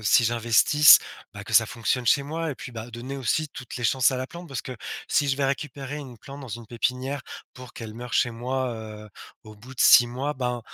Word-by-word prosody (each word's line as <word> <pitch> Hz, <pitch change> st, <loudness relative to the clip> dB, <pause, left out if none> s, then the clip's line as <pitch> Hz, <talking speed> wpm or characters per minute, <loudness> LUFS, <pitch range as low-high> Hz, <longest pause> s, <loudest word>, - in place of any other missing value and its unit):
si 110 Hz, +4 st, +4 dB
j'investisse, 120 Hz, +6 st, +6 dB, 0.3 s
bah, -, -, -9 dB
que -, -, -9 dB
ça -, -, +6 dB
fonctionne 125 Hz, +1 st, -2 dB
chez 140 Hz, +3 st, +3 dB
moi 160 Hz, +2 st, -3 dB
et 140 Hz, -, -6 dB
puis, 140 Hz, -4 st, -9 dB
bah, 115 Hz, +1 st, -8 dB
donner 125 Hz, +4 st, -7 dB
aussi 135 Hz, +5 st, 0 dB
toutes 125 Hz, -, -9 dB
les 125 Hz, -, -5 dB
chances 130 Hz, +2 st, +3 dB
à 130 Hz, -, -3 dB
la 130 Hz, -, -4 dB
plante 170 Hz, +3 st, -11 dB
parce 135 Hz, -3 st, -5 dB
que 130 Hz, -, -8 dB, 0.3 s
si 145 Hz, -1 st, +1 dB
je 135 Hz, -, +1 dB
vais 140 Hz, -, 0 dB
récupérer 140 Hz, 0 st, -3 dB
une 130 Hz, -6 st, -9 dB
plante 140 Hz, +4 st, -11 dB
dans 130 Hz, -, -9 dB
une 115 Hz, 0 st, -7 dB
pépinière 125 Hz, +4 st, -2 dB, 0.3 s
pour 125 Hz, -1 st, -12 dB
qu'elle 110 Hz, -2 st, -9 dB
meurt 120 Hz, +1 st, -7 dB
chez 120 Hz, -, +2 dB
moi, 125 Hz, +2 st, -3 dB
heu, 110 Hz, -1 st, -9 dB, 0.4 s
au 110 Hz, 0 st, -12 dB
bout 125 Hz, +5 st, -13 dB
de -, -, -5 dB
6 120 Hz, -, +7 dB
mois, 135 Hz, +5 st, -3 dB
ben, 125 Hz, -2 st, -3 dB
125 Hz, 235 wpm, -25 LUFS, 120-140 Hz, 0.4 s, 6